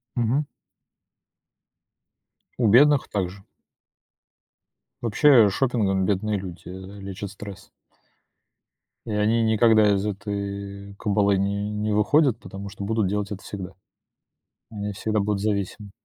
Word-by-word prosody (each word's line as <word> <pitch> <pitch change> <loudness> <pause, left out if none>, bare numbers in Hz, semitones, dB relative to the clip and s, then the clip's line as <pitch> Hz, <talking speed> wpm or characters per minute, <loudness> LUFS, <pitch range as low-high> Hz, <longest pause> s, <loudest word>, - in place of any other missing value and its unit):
Мгм. 125 +5 +1 2.1
У 120 - +3
бедных 140 +6 +5
также. 95 -1 -3 1.6
Вообще, 120 0 +5
шопингом 100 -6 +1
бедные 105 +1 0
люди, 90 -2 -9
э, 95 +2 -9
лечат 100 0 -6
стресс. 100 -1 -10 1.4
И 115 - -5
они 110 +2 +2
никогда 110 -1 +4
из 100 +1 0
этой 100 0 -5
кабалы 100 -1 +1
не 100 +1 -1
не 105 0 -1
выходят, 125 +3 +3
потому 100 -3 -8
что 100 0 -8
будут 110 0 0
делать 105 +1 -2
это 100 - -6
всегда. 95 -2 -7 1.0
Они 105 -2 -4
всегда 110 +2 -1
будут 100 0 -1
зависимы. 100 0 -2
105 Hz, 110 wpm, -24 LUFS, 100-110 Hz, 2.1 s, бедных